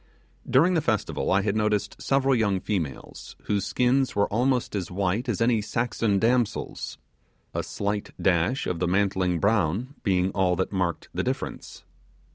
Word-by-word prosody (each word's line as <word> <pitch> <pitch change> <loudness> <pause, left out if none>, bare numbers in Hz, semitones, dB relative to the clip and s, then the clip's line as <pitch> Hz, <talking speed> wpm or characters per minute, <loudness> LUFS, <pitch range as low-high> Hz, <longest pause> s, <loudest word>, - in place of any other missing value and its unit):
During 165 +8 +4
the 165 - +2
festival, 110 - -1
I 100 +1 +3
had 105 0 0
noticed 105 -1 0
several 135 0 +2
young 105 -6 +2
females 85 -10 -4
whose 100 -2 -1
skins 130 +2 +1
were 100 0 +3
almost 125 +1 0
as 95 -4 -3
white 100 +6 -1
as 115 -2 -1
any 115 -2 +3
Saxon 115 -1 0
damsel's; 120 +2 0 0.6
a - - -1
slight 100 0 -3
dash 95 +9 +1
of 85 - -2
the 90 - 0
mantling 95 -1 +1
brown 105 - +1
being 95 -3 +1
all 95 -2 +2
that 95 +1 -1
marked 90 -4 -2
the - - -1
difference. - - -5
100 Hz, 155 wpm, -26 LUFS, 95-120 Hz, 0.6 s, During